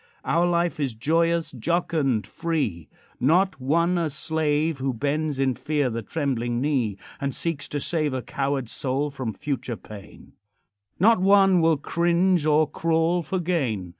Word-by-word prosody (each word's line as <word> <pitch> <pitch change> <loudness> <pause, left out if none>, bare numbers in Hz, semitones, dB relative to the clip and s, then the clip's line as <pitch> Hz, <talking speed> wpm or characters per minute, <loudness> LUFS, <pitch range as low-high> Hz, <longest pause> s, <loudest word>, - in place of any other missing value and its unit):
Our 170 +1 +2
life 170 -1 0
is 135 -6 -2
joyous, 165 +6 +1
jocund, 135 - 0
free 145 - -3 0.3
Not 180 +5 +2
one 170 +6 +2
a 165 -2 0
slave 155 0 0
Who 130 -1 -1
bends 145 +2 -1
in 135 -1 +2
fear 145 0 -1
the 115 +1 -3
trembling 120 -2 -2
knee, 125 -8 0 0.2
And 140 -1 -2
seeks 165 -4 -2
to 145 - -3
save 155 0 0
A 130 - -3
coward 135 -2 -2
soul 135 +5 -2
from 130 -5 -4
future 130 -1 -4
pain; 105 -2 -13 0.7
Not 215 +1 +5
one 195 -2 +5
will 165 -1 +3
cringe 170 +2 +1
or 155 0 +4
crawl 165 +3 +1
for 185 +4 -3
gain. 135 - -1
150 Hz, 150 wpm, -24 LUFS, 130-170 Hz, 0.7 s, Not